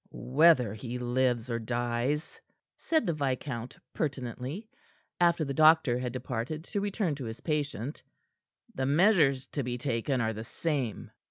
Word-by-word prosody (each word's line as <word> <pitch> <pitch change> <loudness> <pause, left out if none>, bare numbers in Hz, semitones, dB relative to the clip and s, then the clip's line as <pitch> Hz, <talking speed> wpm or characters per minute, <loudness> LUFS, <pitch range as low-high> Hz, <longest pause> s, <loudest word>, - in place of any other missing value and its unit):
"Whether 130 -5 +4
he 120 +3 -5
lives 125 -1 0
or 115 - -1
dies," 120 +5 -2 0.3
said 320 -2 0
the 170 - +1
viscount 130 -4 -3 0.2
pertinently, 135 - -4 0.5
after 170 -2 +3
the 140 - -3
doctor 155 -4 +5
had 125 -1 -3
departed 125 +4 -4
to 200 +3 -3
return 200 -4 -1
to 135 -3 -6
his 110 0 -7
patient, 145 -4 -2 0.7
"the 130 0 -1
measures 150 -4 +4
to 145 - -2
be 125 -1 -3
taken 130 +1 -1
are 110 -1 0
the 110 +1 -6
same." 130 -2 -3
130 Hz, 145 wpm, -29 LUFS, 120-155 Hz, 0.7 s, doctor